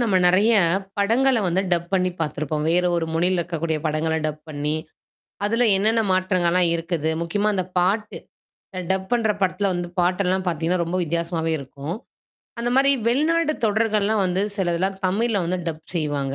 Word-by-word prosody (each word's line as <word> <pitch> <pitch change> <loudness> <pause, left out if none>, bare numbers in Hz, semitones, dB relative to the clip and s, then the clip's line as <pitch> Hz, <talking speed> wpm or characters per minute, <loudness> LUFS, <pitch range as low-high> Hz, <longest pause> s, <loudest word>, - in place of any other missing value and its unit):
நம்ம 220 -6 +2
நிறையப் 190 0 +4 0.2
படங்கள 245 +6 +3
வந்து 180 +1 +1
டப் 170 -1 +1
பண்ணி 185 -1 +2
பார்த்திருப்போம். 155 -1 -2
வேறொரு 175 -1 +2
மொழியில 175 +3 +1
இருக்கக்கூடிய 165 -1 -2
படங்கள 155 +1 0
டப் 155 0 -5
பண்ணி, 150 0 -2 0.7
அதுல 230 +4 +2
என்னென்ன 220 +4 +2
மாற்றங்கள்லாம் 185 -1 +2
இருக்குது? 165 -2 -2
முக்கியமா, 205 +5 0
அந்தப் 185 -2 -3
பாட்டு. 205 +4 0 0.6
அ - - -1
டப் 190 0 -1
பண்ற 230 -3 +2
படத்துல 190 +1 +1
வந்து 175 0 -3
பாட்டு 180 +2 +2
எல்லாம் 185 +1 0
பார்த்தீங்கன்னா, 170 +1 0
ரொம்ப 175 +2 -2
வித்தியாசமாவே 165 0 -2
இருக்கும். 140 +4 -6 0.7
அந்த 240 +1 -1
மாதிரி 275 +1 +5 0.2
வெளிநாட்டு 310 +5 +2
தொடர்கள் 215 0 +1
எல்லாம் 215 0 +1
வந்து 185 +2 0
சிலது 175 -4 0
எல்லாம் 190 +1 -1
தமிழ்ல 205 +1 0
வந்து 180 +2 -1
டப் 160 0 -6
செய்வாங்க. 145 -4 -1
180 Hz, 160 wpm, -23 LUFS, 165-205 Hz, 0.7 s, மாதிரி